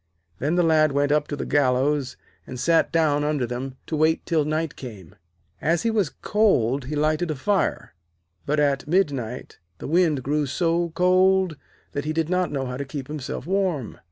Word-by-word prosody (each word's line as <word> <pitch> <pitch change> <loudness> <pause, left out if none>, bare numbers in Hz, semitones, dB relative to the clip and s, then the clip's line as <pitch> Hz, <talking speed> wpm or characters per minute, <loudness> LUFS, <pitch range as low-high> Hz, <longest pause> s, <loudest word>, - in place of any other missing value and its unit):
Then 150 +6 0
the 175 - +3
Lad 155 -3 +3
went 145 +1 +1
up 150 0 +2
to 145 - -3
the - - -4
gallows, 135 0 +1 0.3
and 125 - -7
sat 165 +5 +2
down 150 -3 +2
under 150 -4 0
them 125 +2 -5
to 160 - -3
wait 155 +1 +2
till 160 -4 +1
night 155 0 -2
came. 105 - -10 0.5
As 165 +1 +1
he 230 - +1
was 205 -8 +1
cold 140 - +2
he 150 +4 -4
lighted 155 +3 +1
a 155 - -1
fire, 195 - -1 0.5
but 150 +1 +1
at 140 -1 +1
midnight 140 - -1 0.2
the - - -7
wind 160 -4 +2
grew 145 +2 0
so 170 +3 0
cold 185 -1 +3 0.4
that 145 0 -4
he 155 - -1
did 160 0 -1
not 180 0 +1
know 135 -2 -2
how 125 0 -4
to 140 - -3
keep 135 -1 -7
himself 145 -3 -5
warm. 180 - -1
150 Hz, 185 wpm, -24 LUFS, 135-170 Hz, 0.5 s, the